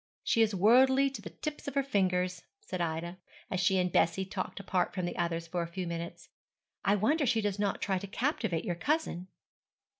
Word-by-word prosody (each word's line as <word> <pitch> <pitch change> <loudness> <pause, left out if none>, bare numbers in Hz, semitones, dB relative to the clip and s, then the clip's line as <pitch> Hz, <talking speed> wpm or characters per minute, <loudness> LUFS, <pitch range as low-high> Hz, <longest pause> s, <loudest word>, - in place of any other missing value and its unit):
'She 230 - +3
is 215 -2 +3
worldly 260 +7 +5
to 270 - -7
the - - -7
tips 300 -1 -6
of 280 - -4
her 275 - +3
fingers,' 185 -7 0 0.2
said 185 - -5
Ida, 170 +2 -3 0.3
as 185 - 0
she 185 +1 +3
and 180 -1 +1
Bessie 170 +4 +2
talked 190 +1 -4
apart 185 -2 -1
from 185 -2 -1
the 175 - -3
others 170 -1 -1
for 175 +1 -2
a 170 - -3
few 180 +2 -4
minutes: 170 0 -6 0.5
'I 200 - +4
wonder 285 - +2
she 230 -1 +3
does 205 -2 -1
not 205 -1 0
try 190 -2 0
to 200 - -7
captivate 220 - -1
your 180 - 0
cousin.' 185 - -1
190 Hz, 205 wpm, -31 LUFS, 175-230 Hz, 0.5 s, worldly